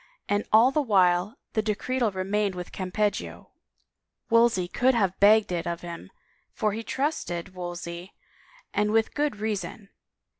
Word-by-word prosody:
And 205 0 0
all 230 +4 +6
the 300 - +1
while 190 -4 +2 0.2
the 220 - +2
decretal 225 +3 -1
remained 195 +1 -1
with 180 0 -7
Campeggio 200 +2 -3 0.4
— - - -56
Wolsey 230 -6 +4
could 255 +7 +2
have 195 -5 0
begged 210 0 +5
it 175 0 -2
of 170 0 -3
him 170 -1 -8 0.4
for 215 -2 0
he 220 +3 -4
trusted 220 - -3
Wolsey 175 0 -7 0.6
and 210 +1 +1
with 225 0 +2
good 295 -4 0
reason! 205 -1 -4
205 Hz, 145 wpm, -26 LUFS, 180-225 Hz, 0.6 s, all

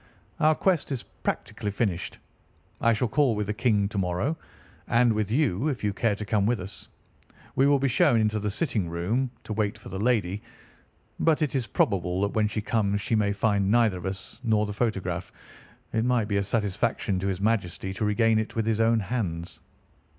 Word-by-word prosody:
"Our 155 +1 +4
quest 175 -5 +1
is 130 -4 -2
practically 105 - -4
finished. 100 -4 -2 0.6
I 115 - +4
shall 120 +3 +1
call 135 0 +2
with 105 0 -1
the 105 - -2
King 105 -2 +2
to 105 - -2
morrow, 95 - 0 0.5
and 120 -1 +4
with 105 -1 -1
you, 125 - +1
if 135 -7 -2
you 105 -1 +1
care 105 0 +1
to 105 - -6
come 105 -1 +1
with 120 0 +1
us. 95 +2 -8 0.7
We 135 - +4
will 145 0 +5
be 135 0 +1
shown 120 -1 +4
into 110 0 +1
the 105 0 -1
sitting 105 - -1
room 105 +11 -1
to 110 - -5
wait 105 -1 -1
for - - -11
the 95 - -5
lady, 105 -4 +1 0.8
but 160 -1 +3
it 150 - -1
is 130 -4 -1
probable 90 -1 +1
that 100 0 0
when 110 -1 +2
she 105 0 -3
comes 100 -2 0
she 105 - -3
may 105 -2 +2
find 100 -1 +1
neither 105 -6 +2
us 95 +3 -6
nor 110 -2 +2
the 105 - -4
photograph. 95 -6 -2 0.6
It 110 0 +1
might 120 -3 +2
be 100 -2 0
a - - +2
satisfaction 100 -1 0
to 95 - -2
his 95 -2 -1
Majesty 95 -3 -1
to 95 - -4
regain 110 +1 +3
it 110 - -4
with 115 -1 0
his 110 -1 +1
own 115 0 +4
hands." 90 -6 -3
105 Hz, 200 wpm, -26 LUFS, 100-115 Hz, 0.8 s, will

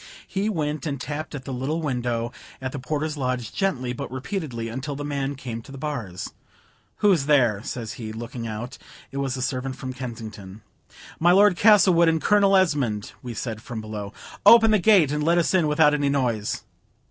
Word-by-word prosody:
He 195 +3 -1
went 155 -5 -2
and 140 -3 -3
tapped 150 +3 -5
at 130 -3 -7
the 135 - -5
little 135 +6 -2
window 120 -5 -2 0.3
at 130 0 -4
the 145 - -5
porter's 150 +3 -3
lodge, 125 -4 -2
gently, 130 -11 -1
but - - -6
repeatedly, 130 - -4
until 130 +5 -5
the 145 +1 -5
man 140 -1 -2
came 120 -4 -6
to 125 - -14
the 135 - -8
bars. 120 -11 -5 0.7
"Who's 175 -9 +4
there?" 120 -9 +3
says 115 -1 -5
he, 110 -2 -7
looking 115 +1 -6
out; 110 +3 -6 0.3
it 135 - -6
was 135 -2 -1
the 130 - -3
servant 130 0 -2
from 130 -1 -6
Kensington. 110 -5 -8 0.6
"My 175 +2 +5
Lord 200 0 +6
Castlewood 185 -4 +6
and 160 0 +1
Colonel 200 +1 +4
Esmond," 140 - 0
we 120 -2 -7
said, 110 0 -4
from 120 -1 -6
below. 105 -2 -6 0.3
"Open 225 -1 +8
the 215 - +4
gate 185 -7 +5
and 150 0 -1
let 170 +3 +3
us 170 - +2
in 175 -5 +3
without 150 0 +4
any 145 -1 +1
noise." 120 -7 -1
135 Hz, 190 wpm, -24 LUFS, 120-160 Hz, 0.7 s, Open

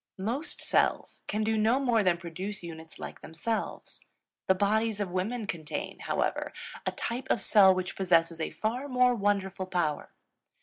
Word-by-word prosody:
Most 245 - -2
cells - - +1
can 215 +1 0
do 220 0 +1
no 225 +5 +3
more 245 -5 +3
than 180 -3 +3
produce 180 +4 -5
units 165 -1 -9
like - - -8
themselves. 195 +8 -4 0.4
The 190 - +5
bodies 215 +2 +1
of 200 -3 -2
women 210 +6 -1
contain, 160 -6 -5
however, - - -1 0.3
a - - +2
type 250 +3 -4
of - - +3
cell 190 -2 +6
which 185 0 -3
possesses 170 -3 +2
a 160 - -1
far 225 - -2
more 250 -2 +4
wonderful 195 -3 0
power. 170 -5 -1
200 Hz, 160 wpm, -29 LUFS, 180-225 Hz, 0.4 s, cell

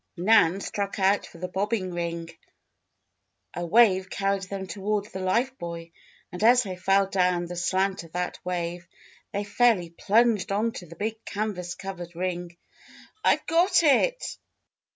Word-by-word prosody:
Nan 190 -1 +4
struck 200 0 -3
out 195 +1 +2
for - - -15
the 180 +2 -4
bobbing 195 -1 -2
ring. 170 -1 -4 1.2
A 175 - -4
wave 190 0 +4
carried 195 0 0
them 190 0 -5
toward 200 +3 -2
the 190 - -5
life 230 +8 0
buoy 170 -1 -7 0.4
and 180 +4 -5
as 245 +2 +6
they 190 -4 -5
fell 195 +2 +3
down 180 -2 +1
the 175 +1 -7
slant 190 +2 0
of 165 - -15
that 180 0 -3
wave, 175 -1 -3 0.4
they 200 0 -2
fairly 205 -5 +2
plunged 215 +3 +2
onto 210 -3 -1
the 165 - -12
big 220 +4 -4
canvas 200 -4 -4
covered 180 -3 -7
ring. 175 -1 -4 0.7
"I've - - +3
got 345 +2 +3
it!" - - +2
190 Hz, 150 wpm, -26 LUFS, 175-210 Hz, 1.2 s, as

